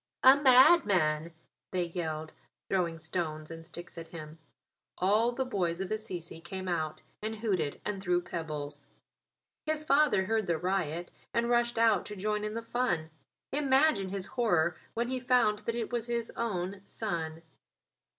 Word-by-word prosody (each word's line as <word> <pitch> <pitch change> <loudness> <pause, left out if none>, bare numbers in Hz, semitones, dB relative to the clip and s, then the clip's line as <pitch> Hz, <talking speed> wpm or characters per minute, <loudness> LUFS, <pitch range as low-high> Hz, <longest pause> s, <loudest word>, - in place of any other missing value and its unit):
"A 260 +1 +10
madman," 210 - +5 0.4
they 180 -1 0
yelled, 160 -2 -4 0.4
throwing 175 -4 +1
stones 160 -1 -3
and 165 0 -8
sticks 170 +1 -8
at 165 - -8
him. 160 -1 -9 0.6
All 210 +6 +3
the 260 +2 -2
boys 180 -8 -1
of 190 0 -4
Assisi 180 -7 -4
came 185 +2 -6
out 160 -3 -2 0.2
and 220 +1 -3
hooted 195 -10 -1
and 200 -2 -2
threw 180 -1 +2
pebbles. 155 -4 -5 0.8
His 310 0 +1
father 285 -9 +4
heard 220 -1 0
the 170 -2 +1
riot 175 -1 -1 0.2
and 235 +1 +2
rushed 240 -1 +2
out 225 -5 +4
to 210 - -6
join 210 +2 -1
in 210 +1 -3
the 230 - -3
fun. 225 -10 -1 0.4
Imagine 270 -7 +3
his 195 -1 -3
horror 175 -9 +1 0.2
when 235 +1 0
he 255 +1 -1
found 245 -4 +3
that 230 +2 -3
it 235 0 -3
was 240 -1 -1
his 235 -1 -2
own 195 -4 -2
son. 165 -7 -4
195 Hz, 155 wpm, -31 LUFS, 170-235 Hz, 0.8 s, A